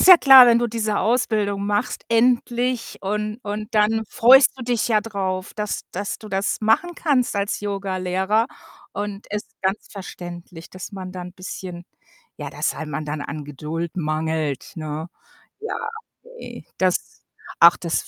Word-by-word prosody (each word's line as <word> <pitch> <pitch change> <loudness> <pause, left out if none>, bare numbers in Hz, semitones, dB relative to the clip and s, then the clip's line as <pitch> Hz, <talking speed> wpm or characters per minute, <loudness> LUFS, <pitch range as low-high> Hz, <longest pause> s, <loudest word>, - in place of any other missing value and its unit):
ist - - +4
ja 370 - +12
klar, 265 -5 +9
wenn 235 -1 +5
du 240 - +1
diese 215 -2 -1
Ausbildung 215 -4 0
machst 205 +4 -1
endlich 245 +1 +1
und 210 +2 -3
und 210 +2 -5
dann 215 +1 +3
freust 260 +4 +7
du 255 - -6
dich 240 -2 0
ja 215 -2 +3
drauf, 190 -3 -4
dass 210 -1 -3
dass 200 +2 -4
du 215 - -11
das 195 +1 -1
machen 225 +11 +2
kannst 260 -9 +1
als 200 0 -1
Yogalehrer 195 +1 0 0.5
und 205 0 -5
ist 210 - -3 0.2
ganz 190 +2 -1
verständlich, 175 -3 -9
dass 185 +3 -8
man 185 -2 -7
da 185 - -6
'n 180 0 -9
bisschen 180 -1 -8 0.5
ja, - - -6
dass - - -1
einem 155 -1 -5
dann 150 0 -4
an 145 +1 -6
Geduld 155 +4 -5
mangelt, 155 -2 -2
ne? 155 -1 -5 0.5
Ja, 450 +1 -4 0.3
okay. - - -11
Das 185 -1 -1 0.4
ach, 170 +1 +8
das 170 -2 -2
200 Hz, 155 wpm, -22 LUFS, 180-225 Hz, 0.5 s, ja